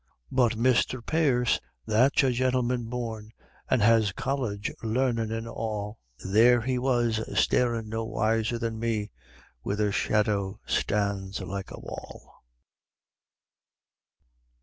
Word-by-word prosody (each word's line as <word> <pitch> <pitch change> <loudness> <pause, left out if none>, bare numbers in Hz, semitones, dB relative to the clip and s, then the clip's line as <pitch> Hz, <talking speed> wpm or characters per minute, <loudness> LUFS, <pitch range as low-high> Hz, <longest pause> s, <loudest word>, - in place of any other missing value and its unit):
But 125 -3 +2
Misther 125 +1 +2
Pierce, 125 -3 +1 0.3
that's 125 +7 +3
a 130 - +3
gintleman 125 -1 0
born, 115 -2 -5 0.4
an' 125 - +3
has 110 -1 +4
college 110 -7 -2
larnin' 115 -1 0
and 115 0 -3
all, 110 -2 -4 0.3
There 115 +5 +5
he 125 +1 -1
was 120 -3 +1 0.2
starin' 115 -3 +1
no 110 +1 -3
wiser 115 0 0
than 115 -1 -3
me 110 -2 -1 0.5
where 100 - -2
the 105 -1 +1
shadow 105 -1 0
stands 100 -1 -1
like 95 +1 -5
a - - -9
wall. - - -10
115 Hz, 115 wpm, -27 LUFS, 105-125 Hz, 0.5 s, There